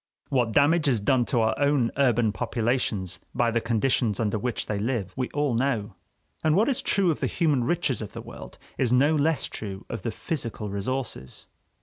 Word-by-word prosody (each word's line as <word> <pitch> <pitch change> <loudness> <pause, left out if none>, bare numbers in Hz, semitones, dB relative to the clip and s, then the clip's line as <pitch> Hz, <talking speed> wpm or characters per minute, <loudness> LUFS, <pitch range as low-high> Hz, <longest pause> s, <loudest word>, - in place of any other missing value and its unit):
What 125 -4 +1
damage 145 +5 +3
is 125 -5 +3
done 120 +4 +2
to 120 -1 +1
our 110 - +2
own 140 -4 +2
urban 120 -5 +3
populations 115 -5 -1 0.2
by 120 -2 +2
the 115 0 +1
conditions 115 -2 +1
under 110 -1 0
which 120 +2 -2
they 105 -2 -2
live, 110 -4 -2
we 130 -1 -2
all 145 -3 0
know. 115 -4 0 0.5
And 155 -1 +3
what 215 +8 +3
is 265 - 0
true 190 -3 +2
of 155 - -3
the - - 0
human 145 -7 +1
riches 155 -7 0
of 105 - -7
the - - -6
world - - -11 0.2
is 125 -3 +2
no 140 +5 +4
less 155 -1 +1
true 100 -3 -6
of 115 - -4
the 115 - -2
physical 115 -6 -4
resources. 100 - -4
120 Hz, 195 wpm, -26 LUFS, 110-140 Hz, 0.5 s, no